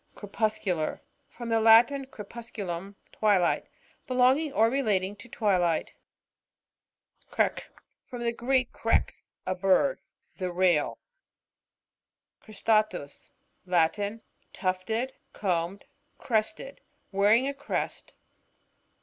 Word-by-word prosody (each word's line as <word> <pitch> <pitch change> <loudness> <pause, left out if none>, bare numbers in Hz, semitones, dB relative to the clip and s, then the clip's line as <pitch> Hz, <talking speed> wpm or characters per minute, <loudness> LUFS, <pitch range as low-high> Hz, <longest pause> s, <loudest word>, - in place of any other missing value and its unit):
Crepuscular.— 205 -5 -1 0.3
From 240 -1 -8
the 225 0 +3
Latin, 235 +5 +6
ere 210 - -6
pusculum, 200 -5 -6 0.2
twilight. 200 -5 +2 0.4
Belonging 260 +4 +3
or 225 -3 +4
relating 210 -7 0
to 205 +4 -13
twilight. 180 -8 +1 1.4
CREx.r— - - -1 0.4
From 245 -1 -6
the 235 0 0
Greek, 255 +1 +1
irex, - - -1
a 185 - 0
bird; 195 - +2 0.4
the 185 -2 -3
Rail. 175 -4 +2 1.4
Cristatus.— 215 -8 -1 0.4
Latin. 200 +5 +1 0.3
Tufted, 215 +7 -2 0.2
combed, 180 0 -2 0.3
crested; 260 - -2 0.3
wearing 210 +6 +4
a 280 - -2
crest. 280 +1 -4
215 Hz, 90 wpm, -28 LUFS, 185-235 Hz, 1.4 s, Latin